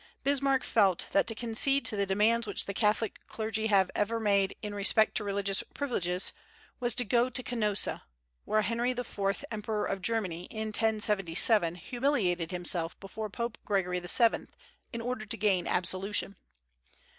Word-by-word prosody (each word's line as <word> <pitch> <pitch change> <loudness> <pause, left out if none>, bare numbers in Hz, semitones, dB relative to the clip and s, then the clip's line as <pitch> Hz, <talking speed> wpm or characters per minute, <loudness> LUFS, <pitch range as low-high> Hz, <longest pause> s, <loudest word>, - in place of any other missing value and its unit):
Bismarck 275 -1 +1
felt 195 -5 +2
that 195 - +2
to 225 - +1
concede 240 +5 +1
to - - +4
the 200 -1 -1
demands 220 +4 +2
which 205 - -3
the 200 - -5
Catholic 210 +1 0
clergy 220 0 -2
ever 195 -3 +3 0.2
have 225 - -3
made 200 -2 +2
in 210 -1 -4
respect 205 +2 +4
to - - 0
religious 200 -1 -1
privileges 185 - -1 0.5
was 240 -2 +1
to 245 - +2
"go 240 +4 +2
to 255 +1 0
Canossa," 215 -4 0 0.4
where 215 0 +1
Henry 235 +4 0
IV. 210 -1 -3
Emperor 215 -1 -3
of 195 - -3
Germany, 185 -5 -2
in 220 +1 -5
1077, 210 -4 +3
humiliated 195 - -1
himself 175 -2 -3
before 215 +2 -6
Pope 235 +3 -5
Gregory 180 -3 -1
VII. 220 +6 +3 0.4
in 235 - -5
order 235 -2 -4
to 225 +2 -4
gain 195 -4 +1
absolution. 190 +2 +1
210 Hz, 155 wpm, -29 LUFS, 195-230 Hz, 0.5 s, to